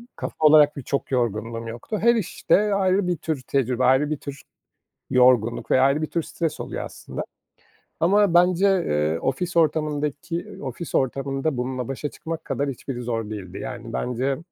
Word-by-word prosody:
kafa - - -5
olarak 150 -1 +6
da - - -4
çok 140 +2 -3
yorgunluğum 115 -2 -1
yoktu. 120 - -5
Her 235 +2 +5
işte 210 0 +1
ayrı 190 -1 +2
bir 175 -1 0
tür 155 -4 -3
tecrübe, 130 -2 0
ayrı 130 +3 +4
bir 155 - -1
tür 140 -1 -8 0.7
yorgunluk 125 -2 +3
ve 130 - +5
ayrı 140 +3 +3
bir 155 - -1
tür 170 - -1
stres 165 -1 -3
oluyor - - -4
aslında. - - -7 0.8
Ama 200 +2 +4
bence, 180 +2 +4
eee, 80 - +1
ofis 170 - -2
ortamındaki 150 +1 -1
ofis 140 +5 -5
ortamında 135 +2 0
bununla 125 0 -3
başa 135 +2 -4
çıkmak 165 +2 -6
kadar 140 0 -1
hiçbiri 130 -1 -5
zor 115 -3 -3
değildi. 100 -3 -7
Yani, 120 -3 -7
bence 130 +3 -1
140 Hz, 160 wpm, -24 LUFS, 125-165 Hz, 0.8 s, olarak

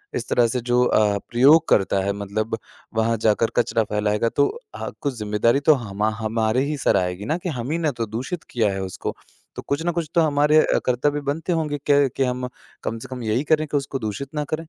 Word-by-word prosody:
इस - - -3
तरह 120 -1 +4
से 125 +2 -1
जो 120 +1 +2
अ, 105 -3 +3
प्रयोग 145 +7 +5
करता 95 -1 +3
है 100 - 0
मतलब 110 +3 -3 0.4
वहाँ 115 +1 +1
जाकर 110 +2 +3
कचरा 115 -2 +2
फ़ैलाएगा 105 +2 0
तो 140 - +2 0.3
अ, - - -4
कुछ 140 -2 -1
ज़िम्मेदारी 105 +5 +1
तो - - +8
हमा 105 +2 0
हमारे 110 +2 0
ही 150 0 -2
सर 130 - +2
आएगी 90 +1 -2
ना 155 +9 0
कि 180 0 -4
हम 125 0 -4
ही 165 - 0
ने 160 -3 0
तो 115 -2 -3
दूषित 125 +11 -5
किया 115 -4 +2
है 95 - -3
उसको। 95 - -5 0.4
तो - - -5
कुछ 140 +3 0
ना 175 - +2
कुछ 165 -3 -3
तो 170 - +5
हमारे 150 0 +3
अ, - - +2
कर्तव्य 145 +4 +1
बनते 160 +5 -2
होंगे 150 -3 -1
कि 140 -2 +5
कि 135 - +3
हम 125 0 -2 0.4
कम 115 - -3
से 130 - -9
कम 125 -2 -5
यही 110 +5 0
करें 155 0 +2
कि 145 - 0
उसको 135 -1 -3
दूषित 110 +6 -4
ना 150 - 0
करें। 155 - -2
125 Hz, 230 wpm, -23 LUFS, 110-145 Hz, 0.4 s, तो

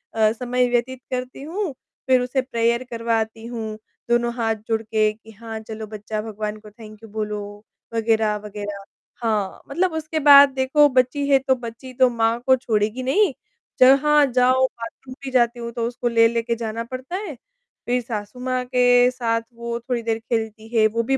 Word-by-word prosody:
अ, 220 -1 +4
समय 250 +1 0
व्यतीत 245 +1 -1
करती 255 +1 -4
हूँ, 345 0 -3 0.3
फिर 255 -1 +4
उसे 250 +1 0
प्रेयर 235 -1 0
करवाती 225 -1 -2
हूँ, 220 -2 -5 0.3
दोनों 240 0 +2
हाथ 225 -2 0
जुड़ 225 -1 0
के 215 -1 +1
कि 220 +1 -17
हाँ, 220 +1 -8
चलो 220 0 -8
बच्चा 215 0 -5
भगवान 215 -1 -5
को 210 - -14
थैंक 215 -1 -13
यू 220 - -11
बोलो, 210 0 -3 0.5
वग़ैरह, 225 -2 +1
वग़ैरह। 205 -1 -6 0.4
हाँ, 210 -4 -1
मतलब 350 +4 0
उसके 315 0 -2
बाद 280 0 +10
देखो 270 +3 +4
बच्ची 260 +2 +1
है, 275 -1 +6
तो 265 0 +1
बच्ची 240 +2 -9
तो 255 0 +4
माँ 230 0 +1
को 260 - +7
छोड़ेगी 220 0 -1
नहीं, 395 +12 +2 0.5
जहाँ 285 +3 +6
जाओ 255 +1 +4
बाथरूम 255 +1 -8
भी 270 - -5
जाती 240 -1 +2
हूँ 235 0 -5
तो 235 -1 -2
उसको 240 0 -3
ले-ले 230 0 +3
के 235 0 -2
जाना 230 0 -4
पड़ता 255 +7 -7
है, 375 -7 -5 0.5
फिर 245 +1 +1
सासू 225 0 -6
माँ 255 0 -1
के 245 -1 +4
साथ 230 -2 -1
वो 235 0 -4
थोड़ी 240 0 -3
देर 225 0 -1
खेलती 220 -1 -3
है, 220 - +5
वो 230 +2 -1
भी 270 +3 +1
235 Hz, 180 wpm, -22 LUFS, 220-255 Hz, 0.5 s, बाद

